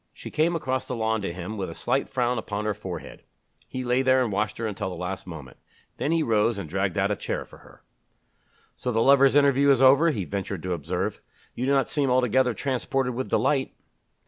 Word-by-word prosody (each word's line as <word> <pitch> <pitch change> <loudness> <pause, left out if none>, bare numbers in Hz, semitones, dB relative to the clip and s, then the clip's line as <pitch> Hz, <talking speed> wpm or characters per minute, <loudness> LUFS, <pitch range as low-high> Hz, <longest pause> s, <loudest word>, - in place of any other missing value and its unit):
She - - -9
came 165 +3 +1
across 130 -4 -2
the 125 - -3
lawn 110 -1 0
to 95 - -3
him 90 +5 -6
with 95 -3 -3
a 80 - -8
slight 130 +3 -1
frown 125 -1 0
upon 105 -1 -4
her 105 - 0
forehead. 95 -5 -8 0.5
He 130 - -5
lay 125 +1 +2
there 130 0 +4
and 115 - -2
watched 105 +2 -1
her 115 - -3
until 105 -3 -3
the 90 - -6
last 90 +2 -5
moment. 75 -7 -9 0.4
Then 150 - -1
he 165 -1 +2
rose 110 -1 +2
and 100 - -5
dragged 95 +3 -1
out 100 +1 +2
a - - +1
chair - - -4
for - - -16
her. - - -19 0.9
"So 125 - -3
the 115 - +1
lovers' 140 0 +5
interview 140 -1 +4
is 135 -3 +5
over!" 135 +5 +6
he 105 - -2
ventured 100 -3 -4
to 90 -1 -1
observe. 80 -5 -3 0.3
"You 125 +2 -3
do - - +2
not 135 -3 +2
seem 140 -3 0
altogether 125 -1 +2
transported 130 -1 -1
with 130 +2 -4
delight." 135 -3 +1
120 Hz, 220 wpm, -25 LUFS, 100-130 Hz, 0.9 s, over